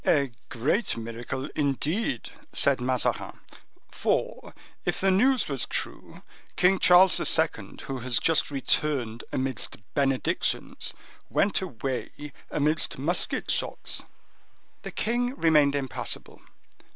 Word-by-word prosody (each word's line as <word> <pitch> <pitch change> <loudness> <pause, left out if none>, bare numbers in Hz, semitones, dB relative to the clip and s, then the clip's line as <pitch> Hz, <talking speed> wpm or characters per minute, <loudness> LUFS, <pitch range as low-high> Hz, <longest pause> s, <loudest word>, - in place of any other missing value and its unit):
"A 140 -4 +2 0.2
great 140 - 0
miracle, 115 +4 -5
indeed," 145 - -1 0.2
said 135 -2 +3
Mazarin; 125 0 -1 0.5
"for, - - -1 0.3
if - - -1
the 195 0 +3
news 250 +6 +3
was 135 -4 -3
true, - - -5 0.3
King 185 +1 +4
Charles 180 +1 +6
II., - - +1
who 135 -1 -4
has 125 -1 0
just 165 -1 +3
returned 135 -4 -1
amidst 130 -2 -2 0.2
benedictions, 135 -2 -1 0.3
went 200 - +2
away 140 -2 -5 0.2
amidst 150 +1 +1
musket 155 +7 0
shots." - - -1 0.8
The - - -6
king 245 +3 -1
remained 150 - +4
impassible. 135 -3 -4
140 Hz, 105 wpm, -27 LUFS, 130-180 Hz, 0.8 s, Charles